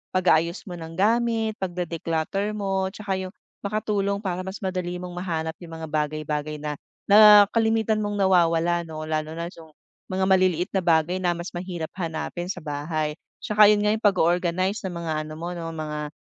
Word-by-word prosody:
pag-aayos 170 -1 +2
mo 175 -4 -8
ng 165 0 -8
gamit, 225 +1 +1
pagde-declutter 175 +2 -2
mo, 195 -2 -1
tsaka 195 -1 -3
'yong 185 +1 -6 0.3
makatulong 200 -1 -1
para 185 0 -3
mas 195 +2 -7
madali 185 -2 -2
mong 180 - -6
mahanap 165 -3 -3
'yong 165 -2 -9
mga 160 0 -6
bagay-bagay 150 0 -2
na 150 -1 -5 0.2
na 210 0 +9
kalimitan 220 -1 +2
mong 205 -1 -2
nawawala, 175 -3 +2
'no? 155 -1 -6
Lalo 155 0 -3
na 170 +1 -4
'yong 160 -4 -15 0.3
mga 190 0 -1
maliliit 185 -2 +2
na 195 - +1
bagay 170 +1 +2
na 175 -2 +1
mas 170 +1 -6
mahirap 175 -2 -5
hanapin 170 +1 -3
sa 185 - -5
bahay. 150 +1 -2 0.3
'Tsaka 210 0 +6
'yun 210 0 +4
nga 210 - +3
'yong 220 - 0
pag-o-organize 185 +2 +1
ng 175 - -6
mga 160 - -2 0.2
ano 155 - -8
mo, 170 +2 -5
'no, 170 -2 -5
mga 150 -1 -4
180 Hz, 175 wpm, -25 LUFS, 160-200 Hz, 0.3 s, na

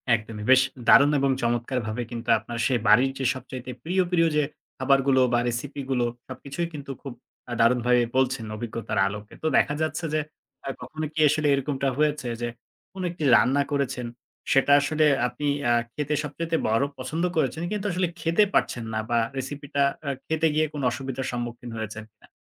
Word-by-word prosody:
একদমই। 110 -1 -6
বেশ 130 0 +8 0.3
দারুণ 140 +1 +7
এবং 135 0 +2
চমৎকারভাবে 120 -1 -1
কিন্তু 120 0 -6
আপনার 115 +2 -7
সে 130 - 0
বাড়ির 125 +6 +5
যে 135 - -1
সবচাইতে 130 -1 -7
প্রিয়, 185 +3 +1
প্রিয় 165 -2 +4
যে 150 - +4 0.3
খাবারগুলো 135 -1 +3
বা 120 - +4
রেসিপিগুলো, 130 +1 -2 0.2
সবকিছুই 140 +6 -5
কিন্তু 140 -2 -7
খুব 135 -3 -7 0.4
আ - - -1
দারুণভাবে 120 +1 +4 0.2
বলছেন 130 -3 +1
অভিজ্ঞতার 110 -1 -3
আলোকে। 105 +1 -7
তো - - +1
দেখা 145 - +3
যাচ্ছে 155 +2 -1
যে, 155 - +2 0.5
আ - - -3
কখনো 155 0 -5
কি 155 - -4
আসলে 150 +1 +1
এরকমটা 140 0 -1
হয়েছে 150 -3 +1
যে 120 - -1 0.5
কোন 190 - -7
একটি 170 -2 -7
রান্না 135 +3 +4
করেছেন, 135 -4 -1 0.5
সেটা 135 +1 +4
আসলে 155 +1 +2 0.2
আপনি 125 +4 -6 0.3
আ - - +5 0.2
খেতে 150 0 -1
সবচাইতে 165 +3 -3
বড় 115 +4 +2
পছন্দ 150 +6 -3
করেছেন, 155 +2 0
কিন্তু 210 -1 -3
আসলে 180 +1 0
খেতে 170 +6 +3
পারছেন 120 - +1
না 110 - 0
বা 120 - +2 0.2
রেসিপিটা 140 +1 -3 0.3
আ - - +1 0.2
খেতে 160 0 +2
গিয়ে 155 - +3
কোন 145 - -4
অসুবিধার 130 +1 -4
সম্মুখীন 120 0 -5
হয়েছেন 110 0 -5
কিনা? 105 - -23
135 Hz, 170 wpm, -25 LUFS, 120-150 Hz, 0.5 s, বেশ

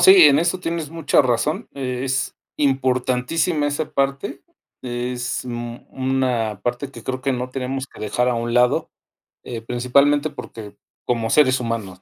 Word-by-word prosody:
Sí, 190 -3 +9
en 145 -1 +7
eso 175 +3 +1
tienes 165 -3 -3
mucha 165 -3 +3
razón, 130 +5 0
es 130 0 -2 0.2
importantísima, 135 +3 +1
esa 145 +1 -2
parte, 140 +6 -1 0.4
es 125 0 -3
un 120 0 -6
una 130 -6 -1
parte 125 +3 -2
que 115 -4 -11
creo 130 +1 -4
que 135 - +1
no 125 0 -2
tenemos 135 +1 -3
que - - -17
dejar 115 +4 0
a 125 - +1
un 115 0 -2
lado, 125 +1 +3 0.5
eh, 120 -2 -5
principalmente 140 +5 +2
porque 110 -7 -9 0.3
como 115 -2 -1
seres 130 -1 +4
humanos, 110 -6 -4
130 Hz, 150 wpm, -22 LUFS, 120-140 Hz, 0.5 s, Sí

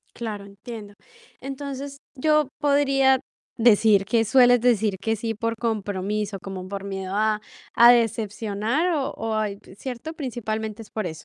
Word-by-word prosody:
Claro, 215 -4 -5
entiendo. 205 +1 -10 0.5
Entonces, 275 0 -6 0.2
yo 305 +1 +2
podría 275 -2 +3 0.4
decir, 220 -3 +5
que 225 +2 +2
sueles 245 +1 +5
decir 220 -4 +2
que 225 +2 0
sí, 225 +1 -3
por 230 +2 -2
compromiso, 210 -2 -2
como 190 -1 -6
por 200 0 -5
miedo 190 -1 -5
a 215 0 +1 0.3
a 235 +1 +8
decepcionar 225 - 0
o 285 -1 -1
o 225 -1 -3
a 215 -1 +1 0.3
¿cierto? 260 +7 -6
Principalmente 220 -6 -4
es 210 - -16
por 215 -3 -3
eso. 160 -3 -7
225 Hz, 145 wpm, -24 LUFS, 205-255 Hz, 0.5 s, a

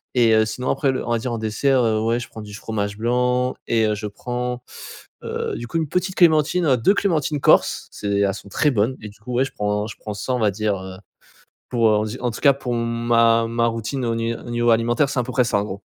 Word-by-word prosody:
et 120 -2 +4
heu, 110 0 +4
sinon 125 +4 -4
après 135 0 +1
le 130 - -3
on - - -1
va 120 - +2
dire 120 +1 -3
en 115 - -3
dessert, 125 +4 +1
heu, 110 -2 +1
ouais 115 +2 +1
je - - -8
prends 110 - -9
du 105 -1 -10
fromage 105 -1 -4
blanc, 125 +2 +1
et 115 -1 +2
heu, 105 - 0
je 105 0 -5
prends, 125 +3 -4 0.6
heu, - - -3
du 120 - -6
coup - - -11
1 160 -2 0
petite 185 +3 -1
clémentine, 165 +1 +3
heu, 130 -3 +4
2 120 - +3
clémentines 155 -7 0
corses. - - +3
C'est 100 -1 -2
elles 100 -1 +2
sont 100 - -11
très 150 +8 +2
bonnes, 115 +2 +1
et 105 - -7
du 100 - -18
coup 125 +4 -7
ouais 125 +2 +3
je - - -8
prends 105 0 -1
je 110 - -8
prends 105 - -6
ça 130 +5 -3
on 125 - 0
va 105 -3 +2
dire, 105 +1 -1
heu, 95 0 -8 0.7
pour, 115 -2 +3
heu 105 - +3
on - - 0
va - - -4
dire 125 +4 -7
en 120 - +1
tout - - -8
cas 140 - +6
pour 125 -3 -4
ma 115 0 +2
ma 115 0 +1
routine 115 +3 -3
au 115 -1 0
ni 115 0 -1
au - - -10
niveau 120 0 +1
alimentaire, 120 +5 +2
c'est 140 - -2
à - - -1
peu 125 - -6
près 125 -1 +3
ça 115 - +1
en 100 - -1
gros. 100 -1 -7
115 Hz, 275 wpm, -22 LUFS, 110-125 Hz, 0.7 s, cas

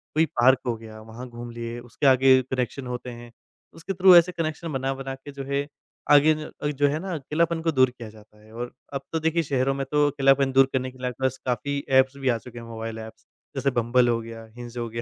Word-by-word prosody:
कोई 160 - +4 0.2
पार्क 130 +2 +6
हो 120 - 0
गया, 110 -1 -11
वहाँ 115 +3 -9
घूम 120 0 -8
लिए 115 0 -6
उसके 120 +3 -2
आगे 130 0 +6
कनेक्शन 130 0 -3
होते 125 0 -5
हैं, 120 0 -10 0.4
उसके 165 +4 -5
थ्रू 185 0 +7
ऐसे 175 +1 +6
कनेक्शन 165 -1 -4
बना-बना 135 0 -3
के 140 +2 -11
जो 140 0 -7
है 140 +1 0 0.4
आगे 150 +2 +7
न 150 -1 -5
जो 145 0 +4
है 150 +2 -2
ना 185 0 -5
अक़ेलापन 160 +3 -1
को 165 - +2
दूर 130 -3 +4
किया 120 -3 -10
जाता 105 0 -18
है। 110 - -18
और 120 +1 -5 0.2
अब 140 - -3
तो 160 - +1
देखिए 160 +1 +1
शहरों 135 -1 0
में 135 0 -3
तो 150 0 +3
अक़ेलापन 135 -1 +3
दूर 135 0 +6
करने 130 0 -1
के 130 - -18
लिए 125 0 -3
आपके 130 +2 -9
पास 130 0 +1
काफ़ी 140 +3 -1 0.2
ऐप्स 135 +1 +1
भी 135 -2 -1
आ 120 - +2
चुके 120 0 -11
हैं, 115 - -10
मोबाइल 115 0 -6
ऐप्स। 110 0 -11 0.3
जैसे 135 0 0
बम्बल 120 +1 +2
हो 115 - +1
गया, 115 0 -9
हिंज 120 0 -9
हो 120 -1 -2
गया, 115 +1 -5
130 Hz, 240 wpm, -25 LUFS, 120-145 Hz, 0.4 s, थ्रू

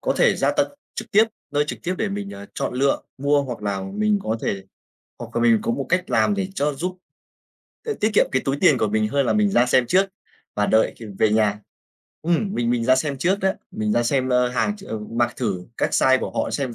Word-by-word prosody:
có - - 0
thể - - +4
ra - - +2
tận 290 - +1 0.3
trực - - -6
tiếp, 215 +2 +6 0.3
nơi 145 0 +1
trực - - -5
tiếp 180 - -1
để 220 - 0
mình, 200 0 -5
à, 100 0 -9
chọn - - -3
lựa, 135 +2 +2 0.2
mua 140 +1 +2
hoặc 125 -5 -6
là 100 -2 -2
mình 215 -1 +2
có 110 +1 -1
thể 95 -1 -2 0.6
hoặc - - -9
là 120 - +1
mình 115 -2 +4
có - - -1
một 135 +1 -2
cách 180 0 0
làm 205 - +3
để 195 -2 -1
cho 145 +1 0
giúp, 180 +6 -4 0.9
ơ, 440 - -1
tiết 215 - +2
kiệm - - +5
cái 130 - +1
túi 135 +1 0
tiền 150 -9 +5
của 110 - +1
mình 110 +1 +1
hơn 140 +2 +1
là - - +2
mình 210 -1 +2
ra 125 -9 +3
xem 125 0 +3
trước 190 +9 +3 0.5
và 105 0 +1
đợi 110 0 +3
kịp 115 - -9
về 110 - +3
nhà. 105 -1 +2 0.6
Ừm, 175 +5 0
mình 120 0 0
mình 120 -1 0
ra 130 +1 +5
xem 140 0 -2
trước 185 +6 +1
đó, 190 0 +2 0.2
mình 105 -1 -2
ra 120 - +2
xem, 130 +2 0
ơ, 125 0 +3
hàng 205 - -1
ch 200 - -13
ờ, 110 - -4
mặc 120 +3 -1
thử 90 -3 -2
các - - 0
size 130 0 +4
của - - -3
họ - - -3
xem 130 -5 -2
130 Hz, 250 wpm, -22 LUFS, 115-185 Hz, 0.9 s, tiếp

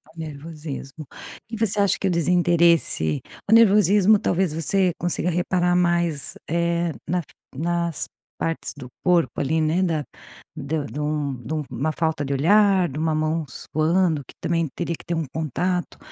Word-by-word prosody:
Nervosismo. 155 -2 -7 0.5
E 225 - -3
você 210 -2 0
acha 200 -1 +3
que 195 - 0
o 185 - +1
desinteresse 170 - +2 0.3
o - - +5
nervosismo 210 -2 +6
talvez 180 -5 0
você 180 +3 +1
consiga 175 0 -1
reparar 175 +1 +1
mais, 170 -4 +1 0.2
eh, 170 0 0 0.2
na 175 +2 0 0.3
nas 170 +1 -1 0.3
partes 165 0 -2
do 130 -3 -8 0.2
corpo 170 -8 +2
ali 155 +4 +1
né 160 +4 +1
da 160 -4 0 0.5
de 150 0 -3
de 145 - -7
um 150 -2 -1
de 125 +6 -5
um 155 - -1
uma 145 +4 -1
falta 160 -2 -1
de 140 - -2
olhar, 190 +5 +4
de 135 - -7
uma 160 0 +1
mão 155 +1 0
suando 160 +3 0
que - - -13
também 165 -2 0
teria 170 -1 -2
que - - -16
ter 170 - -2
um 160 - -1
contato. 175 +4 -2
165 Hz, 160 wpm, -23 LUFS, 155-180 Hz, 0.5 s, nervosismo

